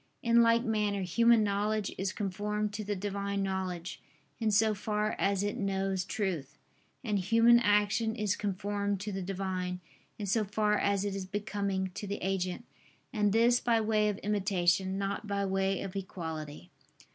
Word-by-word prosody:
In 235 0 +5
like 230 0 +4
manner 210 -4 0
human 230 +5 +4
knowledge 205 +1 0
is 190 0 -2
conformed 210 +1 -2
to 215 +1 -4
the 205 0 -2
Divine 200 0 -2
knowledge, 185 -2 -3 0.4
in 220 -2 +1
so 215 +1 +3
far 210 +1 -1
as 195 0 +1
it 205 - -2
knows 195 -1 -1
truth: 190 - -3 0.5
and 210 -4 0
human 230 +5 +5
action 210 0 +2
is 210 -3 0
conformed 200 0 -2
to 210 0 -4
the 195 0 -3
Divine, 185 -1 -3 0.4
in 210 - -4
so 215 +3 +1
far 210 +1 +1
as 200 -1 +1
it 200 - -2
is 190 -1 -4
becoming 200 -2 -2
to 205 - -6
the 200 +1 -3
agent: 190 +3 -2 0.5
and 210 -3 +2
this 235 +3 +4
by 230 -2 +2
way 215 -1 +2
of 205 - -2
imitation, 190 -2 +1
not 200 +2 -3
by 200 -1 -1
way 195 0 0
of 195 -1 -7
equality. 160 - -6
200 Hz, 165 wpm, -31 LUFS, 190-210 Hz, 0.5 s, In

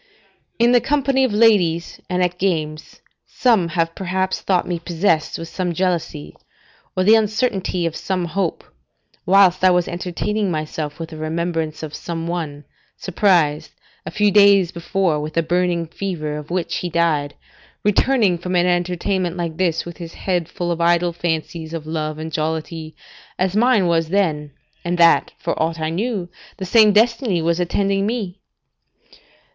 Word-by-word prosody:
] - - -44
In 240 - +4
the 245 -1 +5
company 275 -2 +1
of 260 - +1
ladies, 200 -7 +2
and 180 0 +1
at 180 0 -2
games, 155 -5 -2 0.3
some 225 -9 +2
have 165 0 -1
perhaps 190 +1 -2
thought 185 -2 +1
me 175 -2 -2
possessed 165 -1 0
with 165 - -7
some 180 0 -3
jealousy, 170 - -2 0.6
or 185 - +3
the 210 +4 +6
uncertainty 210 -5 +1
of 165 -1 -2
some 185 -2 -2
hope, 175 0 -2 0.6
whilst 185 -1 +5
I 185 - +7
was 180 -1 +2
entertaining 190 +4 -2
myself 155 -2 -4
with 165 -1 -6
the 160 - -9
remembrance 160 0 -3
of 155 -1 -6
some 165 0 -5
one, 160 -4 -4 0.3
surprised, 170 -5 +1 0.3
a - - -6
few 210 -1 +2
days 200 -3 +5
before, 170 -1 -1
with 155 +2 -6
a 165 - +3
burning 175 0 0
fever 160 -3 -4
of 150 0 -8
which 175 -1 -2
he 180 - -3
died, 155 -4 0 0.5
returning 210 -3 +2
from 180 +1 -3
an 175 0 +3
entertainment 180 0 -1
like 165 -2 -4
this, 170 -3 0
with 170 -1 -9
his 170 -2 -9
head 175 -4 -2
full 175 -1 -3
of 170 0 -2
idle 170 0 +2
fancies 165 -1 -3
of 155 -2 -6
love 155 -1 -3
and 160 +1 -6
jollity, 160 0 -3 0.4
as 185 +1 0
mine 230 -3 +3
was 165 -2 +1
then, 160 -6 0 0.3
and 175 +1 -1
that, 170 -1 +4
for - - -2
aught 165 +1 -1
I 160 0 -2
knew, 200 0 -2 0.3
the 190 - -5
same 215 +2 +5
destiny 225 -2 +2
was 165 +1 0
attending 195 +3 0
me. 210 -5 -3
175 Hz, 165 wpm, -20 LUFS, 165-195 Hz, 0.6 s, I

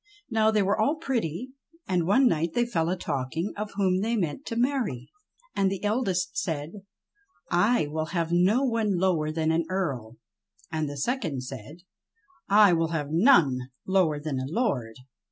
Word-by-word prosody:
Now 220 -1 +3
they 215 -2 +2
were 200 +3 0
all 280 +8 +2
pretty, 255 - -3 0.4
and 180 -4 0
one 255 +8 +4
night 165 -4 0
they 240 - +2
fell 165 -9 -1
a 185 - -1
talking 160 +5 -3
of 210 0 -5
whom 190 -2 +1
they 230 +3 0
meant 195 - -3
to 230 - -3
marry.; 240 - -1 0.4
And 195 -1 +2
the 195 0 -5
eldest 205 -5 0
said, 155 -2 -3 0.8
"I 180 +3 +3
will 155 +2 -3
have 170 0 -2
no 190 +9 +3
one 225 -6 +1
lower 170 -4 +1
than 160 0 0
an 165 +1 +2
j 165 - -8
Earl."! 135 - -3 0.5
And 155 -2 -2
the 145 - -7
second 165 - -2
said, 145 +8 -9 0.7
"I 205 -2 +6
will 165 -1 +2
have 150 -3 -3
none 165 - +5 0.3
lower 180 -6 +2
than 145 -3 -3
a 130 - -3
Lord." 140 - -1
180 Hz, 170 wpm, -26 LUFS, 155-215 Hz, 0.8 s, I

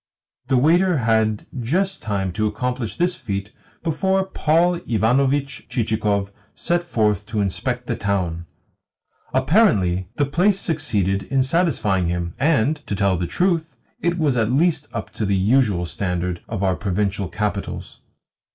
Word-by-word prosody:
The 130 -1 +3
waiter 170 +6 +4
had 110 -3 +1
just 185 +11 0
time 100 -3 -2
to 110 +3 0
accomplish 120 +2 -3
this 175 +1 +2
feat 100 - -4 0.3
before 190 +4 +1
Paul 170 0 +2
Ivanovitch 135 +5 +1
Chichikov 105 -4 0 0.2
set 175 0 0
forth 105 - 0
to 110 -1 -2
inspect 120 +5 -2
the 120 - -2
town. 90 -5 -2 0.8
Apparently 95 - +2
the 145 - +2
place 185 +8 +2
succeeded 105 - 0
in 135 -1 +2
satisfying 120 - +1
him, 85 0 -2
and, 150 0 +2
to 100 - -1
tell 100 -1 +2
the 90 0 -2
truth, 165 - 0 0.2
it 170 +2 0
was 145 -6 +1
at 115 0 +1
least 150 +1 +2
up 115 - -5
to - - -4
the 100 -1 +1
usual 105 -3 +2
standard 90 -1 -2
of 100 -3 -3
our 95 -1 +2
provincial 100 0 -1
capitals. 105 -1 -4
115 Hz, 140 wpm, -22 LUFS, 100-155 Hz, 0.8 s, waiter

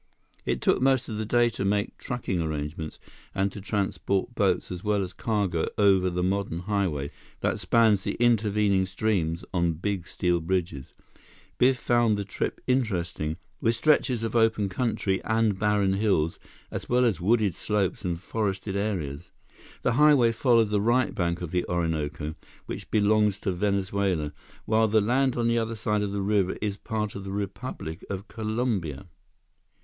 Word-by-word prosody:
It - - 0
took - - +2
most 130 -2 +2
of 110 -1 -4
the 110 - -3
day 120 0 +3
to 100 - -4
make 100 +2 0
trucking 110 -8 -2
arrangements, 75 0 -4 0.4
and 100 +1 +1
to 100 - -8
transport 100 -1 -1
boats - - +1
as 90 -1 -6
well 105 -2 +1
as 90 - -6
cargo 100 -7 -1
over 95 -3 +4
the 90 0 -2
modern 95 -2 -1
highway 90 -8 -1 0.3
that - - 0
spans 110 -4 +3
the - - -1
intervening 105 -5 +2
streams 95 -4 -1
on 85 -2 +2
big 90 +1 -3
steel 90 -1 0
bridges. 85 -5 -3 0.6
Biff 130 +1 +4
found 120 -3 +2
the 100 - -3
trip 95 - -3
interesting, 90 -11 -1 0.2
with 115 +1 +2
stretches 125 -2 +2
of 115 - -3
open 110 -3 +3
country 95 -2 -1
and 110 -3 +1
barren 105 -2 +2
hills 95 -6 +1 0.3
as - - -5
well 125 +1 +4
as 100 -8 +1
wooded 105 0 +2
slopes 105 +1 -1
and 85 -2 -2
forested 100 0 -2
areas. 90 -9 -3 0.5
The - - +2
highway 140 -3 +5
followed 115 -2 +3
the 105 -1 +1
right 120 +4 +2
bank 85 -1 -1
of 85 - -5
the 90 -1 +1
Orinoco, 80 -3 -2 0.3
which - - -7
belongs 105 -1 +3
to 95 - 0
Venezuela, 95 -4 0 0.3
while 110 0 +3
the 110 +1 +3
land 125 +4 +1
on 120 -1 +1
the 115 0 +2
other 115 0 -2
side 105 -1 0
of 100 -1 -2
the 100 -1 -2
river 100 -2 +1
is 105 -2 -2
part 105 -2 -3
of 100 - -7
the 95 - -6
Republic 95 -5 -5
of 100 +1 -5
Colombia. 110 - -2
100 Hz, 165 wpm, -27 LUFS, 90-110 Hz, 0.6 s, highway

